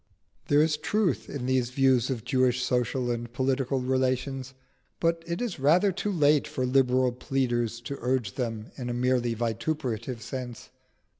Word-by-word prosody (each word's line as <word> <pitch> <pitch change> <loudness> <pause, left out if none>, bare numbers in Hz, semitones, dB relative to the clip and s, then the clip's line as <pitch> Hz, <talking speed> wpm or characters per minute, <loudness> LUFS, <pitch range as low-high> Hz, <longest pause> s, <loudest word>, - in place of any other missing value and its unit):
There 145 +1 +5
is 155 -1 +1
truth 155 - 0
in 130 -3 -4
these 130 -2 +1
views 130 -2 +3
of 120 -5 -3
Jewish 130 -2 +2
social 125 0 0
and 120 0 -4
political 130 +1 0
relations. 130 +1 -1 0.4
But 165 0 +1
it 170 +7 -2
is 225 - -4
rather 170 +9 +4
too 200 +3 -2
late 150 -5 +3
for 130 - -2
liberal 130 -1 +3
pleaders 120 -2 -1
to 140 +3 -6
urge 125 -5 0
them 115 -3 -4
in 125 -2 -4
a 120 - -2
merely 125 -1 +1
vituperative 115 0 -2
sense. 125 -3 -7
130 Hz, 155 wpm, -27 LUFS, 120-140 Hz, 0.4 s, There